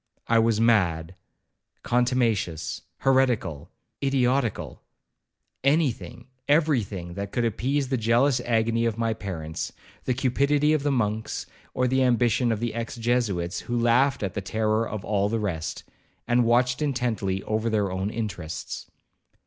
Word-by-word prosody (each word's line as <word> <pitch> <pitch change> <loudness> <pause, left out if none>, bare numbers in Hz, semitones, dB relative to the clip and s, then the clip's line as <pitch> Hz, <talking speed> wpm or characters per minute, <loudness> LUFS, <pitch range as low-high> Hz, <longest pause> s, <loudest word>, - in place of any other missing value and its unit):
I 115 0 +4
was 115 -1 +2
mad, 90 -8 +2 0.7
contumacious, 120 -9 0 0.2
heretical, 115 - +1 0.3
idiotical,—any 135 - -1
thing—every 130 +4 -1
thing—that 95 0 -6
could 120 - 0
appease 130 +5 0
the 130 - +1
jealous 120 +4 +3
agony 115 0 +1
of 115 -2 -1
my 115 -1 0
parents, 85 -7 -5 0.3
the 125 - 0
cupidity 140 +4 +2
of 155 - +1
the 145 - 0
monks, 110 -4 -1 0.3
or 125 - +2
the 130 +1 +2
ambition 120 -1 +3
of 110 - -1
the 120 0 -2
ex 115 0 -4
Jesuits, 115 -7 0
who 120 - -3
laughed 120 +2 +3
at 95 - -2
the 100 - -3
terror 110 +3 0
of 105 -3 -5
all 100 -1 +1
the 115 - 0
rest, 90 -7 -3 0.4
and 120 0 +3
watched 125 +3 +2
intently 120 -9 -1
over 110 +1 -1
their 105 -3 0
own 95 +2 -2
interests. 95 -8 -5
115 Hz, 135 wpm, -26 LUFS, 100-125 Hz, 0.7 s, I